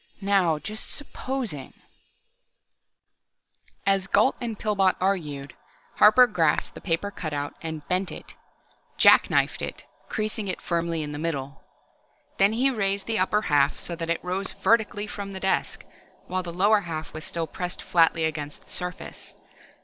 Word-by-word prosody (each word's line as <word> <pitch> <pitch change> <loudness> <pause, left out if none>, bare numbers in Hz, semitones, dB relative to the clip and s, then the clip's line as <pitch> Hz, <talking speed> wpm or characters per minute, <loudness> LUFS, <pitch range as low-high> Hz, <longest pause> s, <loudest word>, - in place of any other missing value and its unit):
Now, 190 -5 +3
just 215 +8 -5
supposing 255 - -4 2.1
the.... 195 - +4
As 195 -1 +1
Gault 210 +7 +4
and 230 -3 -3
Pillbot 200 -3 +2
argued, 150 -8 -1 0.4
Harper 220 +4 +8
grasped 170 -9 +1
the - - -10
paper 190 +3 -1
cutout, 145 -6 -4
and 160 -2 -6
bent 185 +1 0
it, - - -10 0.6
"jacknifed" - - +5
it, - - -6 0.2
creasing 215 -1 -2
it 185 - -2
firmly 170 -2 -1
in 150 - -5
the 145 - -5
middle. 140 -4 -4 0.8
Then 200 +2 +5
he 260 +4 +3
raised 200 -4 0
the 225 -1 0
upper 210 +3 +2
half 145 -3 +3
so 170 - -4
that 165 0 -5
it 170 - -1
rose 185 +2 -2
vertically 220 -2 +1
from 200 -1 -6
the 190 - -5
desk, 190 0 -1 0.4
while 185 +1 -2
the 175 -1 -6
lower 205 +5 +4
half 165 -4 -6
was 155 - -6
still 165 +1 -3
pressed 180 +3 -5
flatly 165 -1 +3
against 150 -2 -4
the - - -25
desk - - -6
surface. 180 +1 -5
185 Hz, 155 wpm, -26 LUFS, 160-205 Hz, 2.1 s, Harper